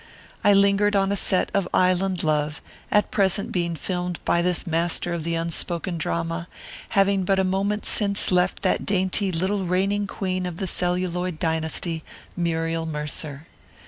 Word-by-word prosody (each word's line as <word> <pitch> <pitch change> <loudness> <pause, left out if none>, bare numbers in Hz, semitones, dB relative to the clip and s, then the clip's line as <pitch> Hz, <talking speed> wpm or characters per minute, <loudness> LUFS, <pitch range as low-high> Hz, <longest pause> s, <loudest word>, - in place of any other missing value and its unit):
I 205 - +6
lingered 200 +1 +3
on 195 0 +2
a - - +1
set 190 -1 +2
of 200 -2 +1
Island 185 0 +2
Love, 150 -1 0 0.3
at 210 - +2
present 195 0 +2
being 170 -2 -1
filmed 180 +1 -3
by 170 - +2
this 180 +1 0
master 170 +1 0
of 170 -2 -3
the 165 +1 -1
unspoken 170 +1 -3
drama, 165 +1 -2 0.5
having 195 -1 +3
but 195 +1 +2
a 190 - +3
moment 195 +3 -1
since 200 -2 +3
left 180 0 +1
that - - +1
dainty 190 0 0
little 190 +4 -1
reigning 195 +3 0
queen 185 -2 -2
of 175 -2 -6
the 190 - -2
celluloid 180 -1 -1
dynasty, 160 0 -1 0.3
Muriel 165 -1 -1
Mercer. 150 -1 -4
180 Hz, 155 wpm, -24 LUFS, 165-195 Hz, 0.5 s, I